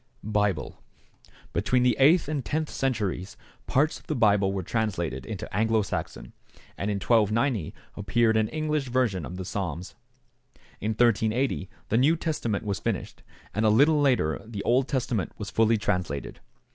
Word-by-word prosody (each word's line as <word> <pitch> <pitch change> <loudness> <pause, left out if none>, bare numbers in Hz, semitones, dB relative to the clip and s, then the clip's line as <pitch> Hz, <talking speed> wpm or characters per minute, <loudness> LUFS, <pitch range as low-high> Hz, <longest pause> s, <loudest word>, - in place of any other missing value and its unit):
=Bible.= 105 -5 -1 0.7
Between 125 -1 +2
the 125 -2 +3
eighth 155 +5 +5
and 145 -3 -2
tenth 155 +3 -2
centuries 105 -8 -2 0.3
parts 150 +4 +1
of - - -25
the 155 - -1
Bible 100 -4 +3
were 95 -1 -3
translated 85 - -2
into - - -6
Anglo 110 0 +2
Saxon, - - -5 0.4
and 100 - -3
in 105 - 0
1290 110 - +1 0.2
appeared 110 +3 +2
an 110 -1 +2
English 155 -1 -2
version 115 - 0
of 90 - -7
the 95 - -5
Psalms. 90 -3 -4 0.9
In 110 +2 -1
1380 115 -1 +1 0.2
the 115 - +2
New 150 +6 +4
Testament 120 -11 -2
was 100 -2 -2
finished, - - -3 0.3
and 110 - 0
a 110 - +5
little 145 +7 +4
later 120 - +2
the 105 -2 -6
Old 130 +2 +2
Testament 125 - -1
was 105 -1 -6
fully 115 0 +3
translated. 90 -8 -2
110 Hz, 155 wpm, -26 LUFS, 100-130 Hz, 0.9 s, eighth